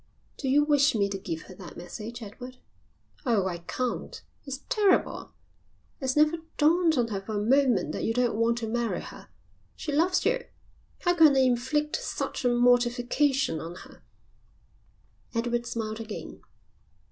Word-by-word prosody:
"Do 270 - -3
you 290 +3 +5
wish 290 -3 +3
me 200 -2 +2
to 195 - -3
give 165 -4 -5
her 185 - -12
that 180 -2 -11
message, 215 +7 -7
Edward? 250 +5 -9 0.7
Oh, 225 -8 +2
I 175 -2 -3
can't. 245 +8 -4 0.3
It's 275 0 -6
terrible. 425 -6 +1 0.6
It's 260 -2 -1
never 305 +2 +4 0.2
dawned 320 +1 +4
on 235 -2 +1
her 200 -3 -3
for 215 +2 -5
a - - 0
moment 245 - +3
that - - -4
you - - +1
don't 245 0 +1
want 230 +2 +1
to 230 -1 -3
marry 235 +1 -1
her. - - -11 0.5
She 295 - -5
loves 340 +6 +2
you. - - +1 0.6
How 350 -1 +3
can 315 -5 +6
I - - +5
inflict 260 +4 +1
such - - -4
a 245 - +3
mortification 245 - +2
on 165 +3 -7
her?" - - -17 1.3
Edward 240 +1 -1
smiled 225 -2 -4
again. 220 -2 -7
245 Hz, 160 wpm, -27 LUFS, 220-290 Hz, 1.3 s, can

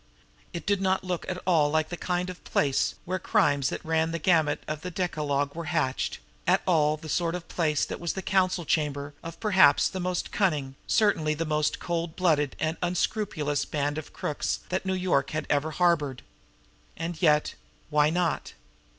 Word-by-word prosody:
It 170 - -6
did 200 -1 +1
not 190 0 +1
look 180 -2 -3
at 185 - -2
all 160 -5 +3
the 155 0 +3
kind 180 +1 -2
of 180 - -13
place 140 -2 +1
where 185 +1 -2
crimes 140 -3 +2
that - - -6
ran 160 0 +1
the 165 - -2
gamut 160 -3 +2
of 155 0 -4
the 180 - -4
decalogue 150 -6 -1
were 170 0 -5
hatched, 160 -6 -1 0.3
at - - +3
all 155 -4 +3
the 155 - -10
sort 170 +2 0
of 180 -2 -7
place 155 -4 +1
that - - -6
was 170 -2 -2
the 190 - -5
council 185 -3 +1
chamber 145 -2 -1
of 165 0 -8
perhaps 190 -10 +5
the 190 - -5
most 180 0 -2
cunning, 150 -9 0
certainly 165 -9 +2
the 165 +2 -2
most 150 -1 0
cold 170 -1 -3
blooded 155 -6 +2
and 155 +1 -1
unscrupulous, 175 -4 0
band 145 0 -2
of 155 - -10
crooks 150 - -2
that 190 +1 -2
New 190 - +1
York 180 -7 +1
had 155 - -2
ever 145 +2 +1
harbored. 155 -6 +1 0.7
And 165 +1 -4
yet 150 -3 +3 0.4
why 150 0 +4
not? 175 0 -1
165 Hz, 180 wpm, -27 LUFS, 150-180 Hz, 0.7 s, perhaps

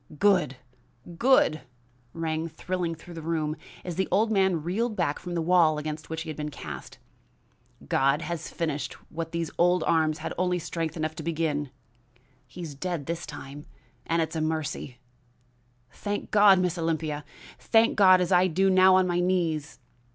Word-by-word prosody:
"Good! 180 -8 +3 0.6
Good!" 240 - +4 0.5
rang 160 0 -2
thrilling 170 +1 -3
through 175 +2 -12
the 165 - -7
room, 155 -1 -1 0.3
as 175 -2 -5
the 190 - +1
old 215 +4 +2
man 190 -6 +2
reeled 215 +7 -1
back 165 -6 -1
from 175 -1 -6
the 165 - 0
wall 165 -3 +4
against 150 0 -5
which 160 0 -4
he - - -8
had - - -7
been 150 0 -4
cast. 75 - -8 0.9
"God 140 +4 +2
has 170 -2 -4
finished 155 -3 -3 0.2
what 165 0 -5
these 170 -2 -3
old 175 0 +4
arms 155 -1 +2
had - - -5
only 180 -1 +1
strength 165 -1 -4
enough 155 0 -2
to - - -4
begin. 155 -3 -1 0.8
He 175 - -9
is 155 -3 -6
dead 165 0 -4
this 170 +2 -4
time, 140 +2 -9 0.4
and 165 0 +2
it's 160 - -6
a 160 - -1
mercy! 155 -5 -3 0.9
Thank 205 0 -4
God, 205 -2 +7
Miss 180 -1 0
Olympia! 160 -2 -2 0.4
thank 225 0 +3
God 185 -3 +6
as 180 - -1
I 180 0 +5
do 190 +3 +2
now 185 0 +6
on 185 0 +4
my 175 -1 0
knees!" 170 -5 0
165 Hz, 170 wpm, -27 LUFS, 155-180 Hz, 0.9 s, God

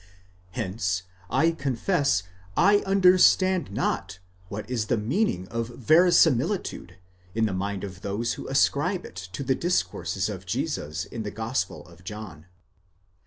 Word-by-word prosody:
2 - - -1
Hence, 90 -2 -2 0.3
I 165 - +3
confess, 140 - 0 0.3
I 200 +3 +6
understand 185 - +4
not 95 -1 -2 0.3
what 105 0 -6
is 115 -4 -2
the 120 - +1
meaning 110 - 0
of 115 0 -2
verisimilitude 155 - +2 0.4
in 110 0 +2
the 105 - -1
mind 100 +1 -3
of 95 -2 -7
those 105 +4 -2
who: - - -7
ascribe - - +1
it - - -11 0.2
to 140 - -4
the 130 - +2
discourses 175 +7 -1
of - - -7
Jesus 75 +4 -2
in 115 - -6
the 105 - -4
Gospel 110 - -3
of 85 0 -17
John. 95 -6 -8
115 Hz, 140 wpm, -26 LUFS, -, 0.4 s, I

